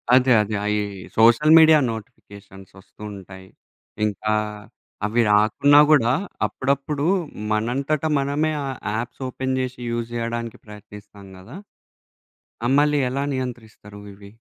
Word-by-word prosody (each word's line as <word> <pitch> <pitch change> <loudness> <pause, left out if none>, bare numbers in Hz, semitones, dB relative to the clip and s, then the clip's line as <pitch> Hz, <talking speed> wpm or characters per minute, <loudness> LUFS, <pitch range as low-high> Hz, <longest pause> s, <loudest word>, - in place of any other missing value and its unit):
అదే. 130 0 +3
అదే. 105 +1 -3
అయి 105 0 0 0.4
సోషల్ 120 +8 +5
మీడియా 160 -1 +7
నోటిఫికేషన్స్ 100 -3 -12
ఒస్తూ 95 - -21
ఉంటాయి. 95 -1 -12 0.6
ఇంకా 105 +1 -2 0.7
అవి 115 +3 +1
రాకున్నా 110 +8 +4
కూడా 120 -6 +4 0.3
అప్పుడప్పుడు 140 +2 -2 0.5
మనంతట 135 +8 -1
మనమే 145 +3 -1
ఆ - - -4 0.3
యాప్స్ 120 +4 -6
ఓపెన్ 130 +1 -3
జేషి, 130 -1 -4
యూజ్ 120 0 -4
జేయడానికి 115 -1 -4
ప్రయత్నిస్తాం 105 -1 -13
గదా! 110 - -12 1.1
ఆహ్, 130 - +2
మల్లి 150 0 +2
ఎలా 135 +2 -2
నియంత్రిస్తారు 110 -5 -7
ఇవి? 100 0 -15
115 Hz, 115 wpm, -22 LUFS, 105-135 Hz, 1.1 s, మీడియా